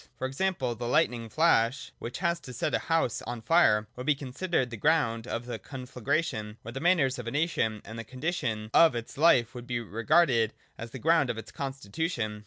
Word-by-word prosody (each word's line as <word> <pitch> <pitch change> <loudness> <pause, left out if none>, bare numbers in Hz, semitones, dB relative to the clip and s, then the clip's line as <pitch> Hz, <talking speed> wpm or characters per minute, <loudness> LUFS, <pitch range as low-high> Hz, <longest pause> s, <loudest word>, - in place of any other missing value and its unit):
For - - -3
example, 135 -2 -1
the 120 +1 -5
lightning 120 -5 +1
flash 130 -3 +2
which 120 - -5
has 170 0 0 0.2
set - - -1
a - - +2
house 165 -8 0
on 120 -2 -5
fire 110 -8 +4
would 125 +1 -7
be 150 - +4
considered 135 0 -2
the - - -4
ground 115 -4 +1
of 115 -1 -3
the 120 - -5
con 130 -3 -8
flagration: 125 -4 -2
or 115 - -6
the 135 - -5
manners 150 -7 +2
of 120 - -6
a - - -2
nation 140 -9 0
and 115 +2 -8
the - - -4
condition 125 -5 -3
of 165 -6 +6
its 115 -1 -5
life 135 -6 +4
would 125 -1 -9
be 120 -1 -1
regarded 115 +1 +2 0.2
as 115 - -7
the 130 - -8
ground 160 0 +3
of 115 - -2
its 110 - -8
constitution. 135 - -3
125 Hz, 200 wpm, -28 LUFS, 115-155 Hz, 0.2 s, of